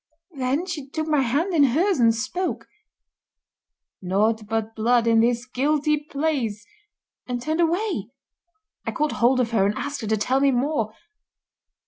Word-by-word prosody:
Then 275 +3 -1
she 305 -7 -6
took 315 +2 -3
my 305 -3 +2
hand 290 +10 0
in 305 -4 +5
hers 315 +7 +2
and 230 -1 +4
spoke: 255 +11 -3 1.4
'Naught 210 +4 0
but 225 0 -2
blood 235 +1 +2
in 230 -1 +4
this 235 +1 +2
guilty 295 +3 0
place,' 265 -9 -2 0.6
and 245 -1 -2
turned 315 +7 -1
away. 340 - 0 0.7
I - - -4
caught 300 -1 0
hold 255 +2 +4
of 240 -2 0
her 220 -4 +3
and 205 - -1
asked 285 -1 -4
her 220 - -4
to 220 +1 +1
tell 255 +6 +1
me 280 0 +4
more. 250 -3 0
255 Hz, 155 wpm, -23 LUFS, 225-300 Hz, 1.4 s, in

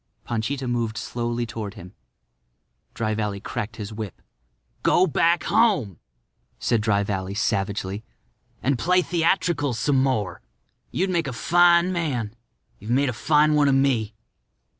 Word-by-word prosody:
Panchita 125 +4 -2
moved 120 -2 -1
slowly 120 0 -2
toward 110 -3 -6
him. 90 -2 -11 1.0
Dry 110 -1 -1
Valley 105 -2 -2
cracked 110 +1 -5
his 105 0 -7
whip. 105 -3 -6 0.6
"Go 185 - +4
back 170 +1 +2
home," 200 - +2 0.6
said 115 -3 +1
Dry 100 -2 +2
Valley, 95 -1 -3
savagely, 100 -1 -1 0.6
"and 135 -2 +1
play 180 +4 +3
theatricals 165 - +1
some 135 +3 +2
more. 120 -8 -1 0.5
You'd 190 +1 -1
make 170 -4 0
a - - -3
fine 175 +7 +4
man. 125 -11 -2 0.4
You've 105 - -10
made 135 +3 +2
a - - -2
fine 150 +5 +3
one 150 -1 +4
of 135 - +4
me." 120 -6 +1
120 Hz, 140 wpm, -24 LUFS, 105-150 Hz, 1.0 s, Go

